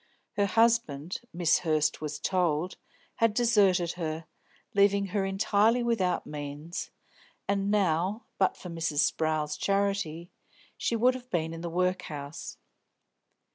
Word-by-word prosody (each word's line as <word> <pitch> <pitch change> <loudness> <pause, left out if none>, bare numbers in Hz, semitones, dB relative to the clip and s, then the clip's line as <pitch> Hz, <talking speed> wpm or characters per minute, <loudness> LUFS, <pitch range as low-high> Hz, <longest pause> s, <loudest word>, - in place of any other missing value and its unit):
Her 200 -1 +1
husband 200 -8 +1
Miss 170 -1 +3
Hurst 155 -3 +1
was 150 -1 -4
told 180 -2 0 0.4
had 230 -2 +2
deserted 200 -8 +3
her, 160 -2 -4 0.5
leaving 200 0 +4
her 200 -2 +1
entirely 210 +4 +2
without 210 -7 0
means, 150 +3 -6 0.6
and 200 0 0
now, 200 +2 +1
but 190 - +2
for 180 - -9
Mrs. 160 -3 0
Sprowl's 155 -2 0
charity, 195 -4 -1 0.4
she 235 - -1
would 245 +3 +4
have 250 -1 -9
been 165 -5 -1
in 165 - -7
the 170 - -4
workhouse. 165 -5 -3
180 Hz, 125 wpm, -29 LUFS, 160-200 Hz, 0.6 s, leaving